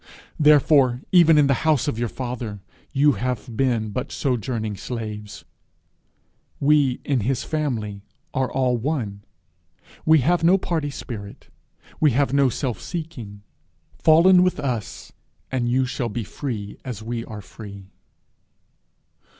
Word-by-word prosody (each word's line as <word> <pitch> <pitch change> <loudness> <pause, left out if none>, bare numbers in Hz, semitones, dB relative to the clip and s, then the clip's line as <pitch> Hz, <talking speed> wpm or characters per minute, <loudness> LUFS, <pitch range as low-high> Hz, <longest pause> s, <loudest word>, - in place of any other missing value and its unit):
Therefore, 145 -4 +5
even 165 -4 +6
in 150 - +6
the 140 - +3
house 155 -5 +2
of 115 - -2
your 120 -1 -1
father, 120 -5 -5 0.3
you 145 +1 +4
have 125 -2 -3
been 115 -4 0
but 125 +5 -4
sojourning 115 -4 -2
slaves. 105 -2 -6 1.1
We 140 -3 +3
in 140 -3 +1
his 125 +3 -1
family 115 -10 -3 0.3
are 130 -1 0
all 130 -2 +1
one; 115 -6 -3 0.8
we 160 -2 +5
have 170 +5 +2
no 180 +3 +6
party 160 -5 -2
spirit; 110 -7 -8 0.5
we 150 -5 +4
have 140 -2 +2
no 140 -2 +4
self 125 -3 -3
seeking: 125 - -7 0.6
fall 160 +3 +5
in 185 -1 +7
with 180 0 +1
us, 120 -7 -4 0.4
and 125 -2 0
you 130 +2 +2
shall 125 -1 -3
be 115 +2 -3
free 105 -4 -6
as 120 -5 -6
we 115 +1 -3
are 105 -2 -8
free.' 100 -3 -11
125 Hz, 135 wpm, -23 LUFS, 110-145 Hz, 1.1 s, in